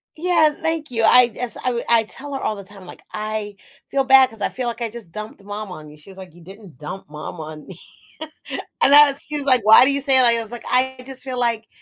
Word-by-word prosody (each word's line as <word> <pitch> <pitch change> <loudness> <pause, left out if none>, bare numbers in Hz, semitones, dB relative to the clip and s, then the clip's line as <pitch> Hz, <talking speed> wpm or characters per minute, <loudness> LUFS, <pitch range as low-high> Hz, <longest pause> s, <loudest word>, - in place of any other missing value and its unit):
Yeah. 320 -2 +3
Thank 320 -3 -2
you. 225 -2 -1
I 250 +3 +7 0.2
as 245 -1 -3
I - - -9
w 235 -1 -3
I 230 -1 +4
tell 280 +6 -7
her - - -3
all 215 - -2
the 200 - -9
time, 195 0 -14
like, - - -13
I 215 -1 -4 0.3
feel 275 -1 +1
bad 265 -1 +6
'cause 225 - -14
I - - 0
feel, 250 -1 -4
like, 235 0 -5
"I 230 - -2
just 220 -6 -11
dumped 215 +1 -9
mom 205 0 -7
on 155 -4 -10
you." 150 - -15
She 155 +6 -16
was, 190 - -16
like, 185 -3 -11
"You 175 - -16
didn't 190 - -14
dump 150 +5 -9
mom 150 +3 -8
on 155 -1 -9
me." 185 -3 -11 1.0
and 280 - +5
I 295 -1 +8
was 275 - -7
she 300 - -4
was, 290 - -4
like, 255 -3 +4
"Why 220 +3 +8
do 270 - +3
you 280 - -1
say 270 -1 +3
that?" 255 - +5
I 235 -1 +3
was, 225 -1 -7
like, 240 - -8
"I 260 +1 +1
just 265 -1 -9
feel, 260 -2 -5
like, 230 -2 -1
230 Hz, 275 wpm, -20 LUFS, 200-265 Hz, 1.0 s, I